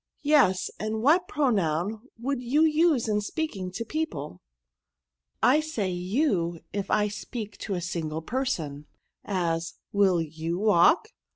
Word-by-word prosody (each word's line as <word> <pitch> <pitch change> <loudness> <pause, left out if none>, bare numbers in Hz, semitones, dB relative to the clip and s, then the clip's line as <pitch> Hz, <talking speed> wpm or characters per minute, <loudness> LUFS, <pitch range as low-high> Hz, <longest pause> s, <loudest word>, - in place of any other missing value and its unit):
' - - -44
Yes; 285 -12 +3
and 215 +1 -2
what 345 +7 +4
pronoun 210 - 0 0.2
woidd 265 +1 -2
you 270 +6 +2
Use 310 -5 +3
in 210 -1 +1
speaking 205 - -3
to 230 +4 -4
people?'* 230 - -4 0.5
'* - - -29
I 300 - +4
say 235 -12 -2
you 180 - 0
if 200 -1 -3
I 210 0 +3
speak 215 +1 -6
to 200 - -3
a 175 - -3
single 160 -3 -3
person; 160 - -3 0.4
as, 170 -4 -1 0.2
will 195 -3 +3
pou 160 +2 -4
walk 215 - +4
205 Hz, 145 wpm, -27 LUFS, 170-265 Hz, 0.5 s, what